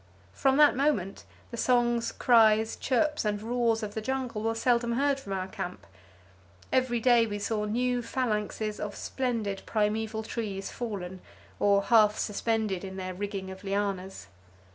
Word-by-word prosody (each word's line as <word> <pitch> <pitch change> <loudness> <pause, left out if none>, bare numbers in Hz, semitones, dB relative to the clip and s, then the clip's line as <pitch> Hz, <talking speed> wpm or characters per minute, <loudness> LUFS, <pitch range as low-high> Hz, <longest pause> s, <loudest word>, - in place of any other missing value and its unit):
From 270 0 +2
that 295 -3 +6
moment 255 -9 0 0.3
the 235 - -6
songs, 240 -1 +2
cries, 220 -2 +4
chirps 300 +4 0
and 210 -1 -1
roars 230 0 0
of 205 -1 -4
the 220 - -3
jungle 255 -2 -3
were 225 +1 0
seldom 235 0 +1
heard 275 +2 +1
from 200 -7 -9
our 190 -1 -2
camp. 190 -3 -6 0.9
Every 255 -2 +2
day 230 -3 +3
saw 210 +1 -1
new 245 +3 0
phalanxes 215 -3 -2
of 205 -1 -4
splendid 230 -7 -2
primeval 220 +1 0
trees 210 -4 -4
fallen, 190 -6 -5 0.4
or 200 -1 +3
half 215 -1 +5
suspended 215 -3 -1
in 190 0 -7
their 185 -1 -4
rigging 195 0 -5
of 190 +1 -10
lianas. 195 -1 -2
220 Hz, 145 wpm, -28 LUFS, 200-240 Hz, 0.9 s, that